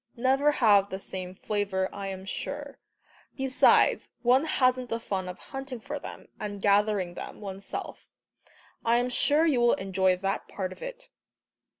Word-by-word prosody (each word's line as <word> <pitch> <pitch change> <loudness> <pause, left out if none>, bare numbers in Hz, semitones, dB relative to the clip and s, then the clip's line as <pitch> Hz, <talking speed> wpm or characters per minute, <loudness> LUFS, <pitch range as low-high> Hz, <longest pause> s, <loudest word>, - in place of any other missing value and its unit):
"never 270 +4 +3
have 205 -6 +4
the 190 - -5
same 185 -1 -6
flavour, 200 -2 -1
I 200 -1 -5
am 190 -1 -6
sure. 285 +7 -5 0.6
Besides, 265 -1 +4
one 255 +5 +4
hasn't 255 -4 +2
the 230 - -1
fun 190 -5 -3
of 180 - -7
hunting 270 -2 -7
for 285 +6 -5
them, - - -9
and 205 -1 -5
gathering 200 -2 +2
them - - -8
one's 195 -1 -7
self. - - -7 0.8
I 230 +1 +3
am 245 +1 +2
sure 295 +5 +3
you 275 -7 +3
will 240 0 +5
enjoy 190 -1 +1
that 195 +2 -2
part 185 -2 -4
of - - -18
it." - - -8
215 Hz, 165 wpm, -28 LUFS, 195-265 Hz, 0.8 s, will